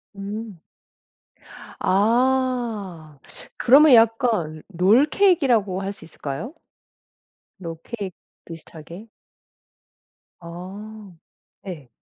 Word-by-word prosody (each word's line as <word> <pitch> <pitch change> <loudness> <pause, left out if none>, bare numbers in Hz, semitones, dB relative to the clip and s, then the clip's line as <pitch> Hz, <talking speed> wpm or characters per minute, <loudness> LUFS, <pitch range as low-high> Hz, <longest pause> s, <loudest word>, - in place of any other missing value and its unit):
음. 205 0 -7 1.2
아 225 - 0 0.4
그러면 275 +3 +6
약간 225 - +2
롤케이크라고 230 - +2
할 195 +1 -4
수 - - -15
있을까요? 155 - -7 1.1
롤케이크 185 +4 -7 0.3
비슷하게? 165 +4 -11 1.3
아 195 +5 -10 0.6
예. 160 -9 -8
205 Hz, 145 characters per minute, -22 LUFS, 170-235 Hz, 1.3 s, 그러면